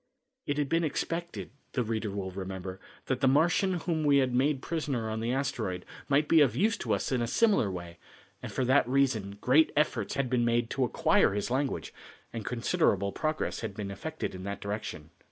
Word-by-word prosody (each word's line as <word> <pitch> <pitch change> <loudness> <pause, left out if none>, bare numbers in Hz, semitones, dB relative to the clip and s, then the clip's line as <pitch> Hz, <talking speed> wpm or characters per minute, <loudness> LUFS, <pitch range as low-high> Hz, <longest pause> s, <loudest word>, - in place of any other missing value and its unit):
It 145 - 0
had 145 -1 +1
been 165 +4 +1
expected, 170 +2 -3 0.2
the 125 - +1
reader 110 -1 -2
will 95 -1 -4
remember, 95 0 -6 0.3
that 130 -1 -1
the 135 - +4
Martian 170 +7 +3
whom 165 -2 -1
we 145 -1 +5
had 130 -2 +2
made 135 +2 +1
prisoner 140 -9 -2
on 110 - -2
the 115 +2 -1
asteroid, 125 -9 -2 0.2
might 145 +2 +3
be 165 -2 +6
of 140 -4 +4
use 220 +4 +2
to - - 0
us - - -3
in 125 -2 +1
a 120 - 0
similar 200 - +3
way, 85 -2 -7 0.4
and - - -6
for 130 - 0
that 130 -1 +3
reason 120 -7 +1
great 145 +6 +4
efforts 130 -8 +1
had 140 -1 0
been 125 -1 +1
made 120 0 +1
to 135 - +1
acquire 110 -4 +3
his 105 +3 -2
language, 135 +1 -1 0.4
and 115 -2 -4
considerable 115 - +1
progress 155 +6 -2
had 110 -4 -5
been 100 -2 -4
effected 160 +11 -5
in 95 - -7
that 100 +1 -4
direction. 100 -7 -5
125 Hz, 200 wpm, -29 LUFS, 100-145 Hz, 0.4 s, be